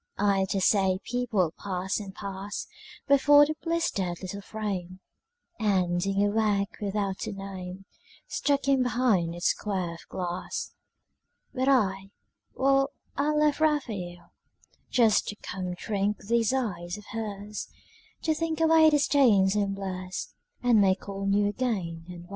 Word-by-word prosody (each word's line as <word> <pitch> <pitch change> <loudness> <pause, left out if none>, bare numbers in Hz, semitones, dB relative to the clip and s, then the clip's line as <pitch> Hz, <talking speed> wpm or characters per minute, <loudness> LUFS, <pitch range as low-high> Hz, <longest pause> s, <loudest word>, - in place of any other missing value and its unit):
I 195 -1 +2
dare 195 -1 0
say 190 -1 +3
people 230 -9 0
pass 190 0 -2
and 195 -2 -8
pass 200 0 -5 0.4
Before 290 +1 +7
the 310 - -2
blistered 205 - -1
little 200 +2 -5
frame, 190 -4 -5 0.6
And 185 -5 +1
dingy 195 +2 +1
work 205 -1 0
without 200 -1 -2
a - - -3
name 195 -1 -7 0.4
Stuck 280 -1 0
in 270 -2 +4
behind 235 -9 +1
its 175 - +1
square 185 -5 -2
of 170 - -13
glass. 180 0 -4 0.8
But 260 0 +1
I, 195 -7 +2 0.5
well, 275 +1 +3 0.3
I 285 +2 +1
left 300 -1 +2
Raphael 210 - -1 0.6
Just 225 -4 +3
to 205 - -4
come 185 -3 -5
drink 205 +2 -1
these 230 +1 +2
eyes 185 -9 -2
of 210 - -12
hers, 210 -1 -5 0.6
To 320 - +2
think 320 0 -2
away 320 -1 +6
the 300 - +4
stains 235 -10 +4
and 200 -1 0
blurs 185 -1 -5 0.3
And 240 -4 +5
make 190 0 +2
all 195 0 -4
new 200 +1 +3
again 195 -8 -2
and 175 -1 -9
well. 175 - -17
200 Hz, 140 wpm, -27 LUFS, 190-245 Hz, 0.8 s, Before